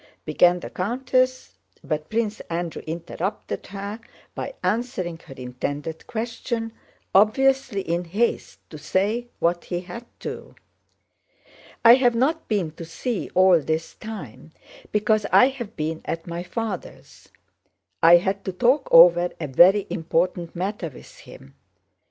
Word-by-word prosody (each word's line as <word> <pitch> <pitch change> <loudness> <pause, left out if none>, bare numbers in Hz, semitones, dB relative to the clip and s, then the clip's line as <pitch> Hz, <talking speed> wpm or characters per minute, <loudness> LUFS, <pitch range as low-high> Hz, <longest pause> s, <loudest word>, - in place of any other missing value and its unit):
began 175 +3 +3
the - - -7
countess, 255 +5 -1 0.2
but 155 -1 -3
Prince 220 -1 -1
Andrew 170 0 -3
interrupted 170 +5 -4
her 200 +2 -6 0.3
by - - -6
answering 195 -5 -2
her 135 - -10
intended 145 +5 -5
question, 230 0 -4 0.4
obviously 235 +2 +3
in 175 0 -2
haste 210 +8 -2
to 155 - -9
say 210 +10 -1
what 170 +1 0
he 175 -1 -3
had 180 +6 -9 0.2
to. - - -7 1.3
"I 230 - +11
have 245 -2 +4
not 300 +7 0
been 195 -8 -1
to - - -7
see 200 +7 -4
you - - -12
all 185 -2 +6
this 160 +2 -3
time 160 - -9 0.4
because 210 0 +1
I 250 - +7
have 240 -5 -8
been 160 +1 -3
at 165 0 -4
my 170 0 -5
father's. 205 0 -7 0.7
I 170 +1 +8
had 195 +3 -2
to 190 - -2
talk 250 +9 +2
over 175 +1 +7
a 160 - -3
very 180 +9 +5
important 170 +1 -1
matter 185 -1 -3
with 135 - -15
him. 70 - -14
185 Hz, 135 wpm, -23 LUFS, 170-230 Hz, 1.3 s, I